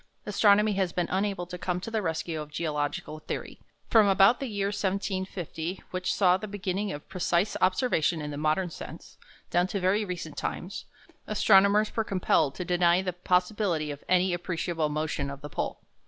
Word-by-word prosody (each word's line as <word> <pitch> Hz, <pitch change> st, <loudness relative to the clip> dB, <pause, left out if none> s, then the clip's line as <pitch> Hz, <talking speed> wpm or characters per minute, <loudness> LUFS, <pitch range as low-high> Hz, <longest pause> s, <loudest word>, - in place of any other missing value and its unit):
Astronomy 210 Hz, +1 st, +4 dB
has 190 Hz, -2 st, 0 dB
been 175 Hz, 0 st, -1 dB
unable 195 Hz, -1 st, -1 dB
to 180 Hz, 0 st, -8 dB
come 180 Hz, 0 st, -1 dB
to 225 Hz, -, -6 dB
the 220 Hz, -1 st, 0 dB
rescue 160 Hz, -2 st, -2 dB
of 150 Hz, -, -8 dB
geological 150 Hz, 0 st, -3 dB
theory. -, -, -6 dB, 0.3 s
From 220 Hz, -3 st, +5 dB
about 195 Hz, +4 st, +5 dB
the 270 Hz, -, -3 dB
year 200 Hz, -3 st, -1 dB
1750, 190 Hz, -3 st, -3 dB
which 185 Hz, 0 st, -1 dB
saw 185 Hz, -2 st, +4 dB
the 215 Hz, +2 st, -6 dB
beginning 200 Hz, 0 st, -2 dB
of 145 Hz, -, -7 dB
precise 180 Hz, +1 st, 0 dB
observation 185 Hz, -, +2 dB
in 150 Hz, -1 st, -4 dB
the -, -, -5 dB
modern 155 Hz, +4 st, 0 dB
sense, -, -, -10 dB, 0.3 s
down 175 Hz, +1 st, +3 dB
to 200 Hz, -, -2 dB
very 190 Hz, +4 st, +2 dB
recent 175 Hz, -6 st, -6 dB
times, 185 Hz, +3 st, -4 dB, 0.4 s
astronomers 210 Hz, 0 st, +4 dB
were 225 Hz, -, +1 dB
compelled 170 Hz, -8 st, +1 dB
to 180 Hz, -, -4 dB
deny 175 Hz, +1 st, +3 dB
the 180 Hz, -1 st, -2 dB
possibility 180 Hz, -3 st, 0 dB
of 145 Hz, -, -9 dB
any 185 Hz, 0 st, +3 dB
appreciable 170 Hz, -2 st, -2 dB
motion 150 Hz, -2 st, -2 dB
of 140 Hz, 0 st, -8 dB
the 145 Hz, -, -7 dB
pole. -, -, -3 dB
180 Hz, 175 wpm, -28 LUFS, 165-200 Hz, 0.4 s, From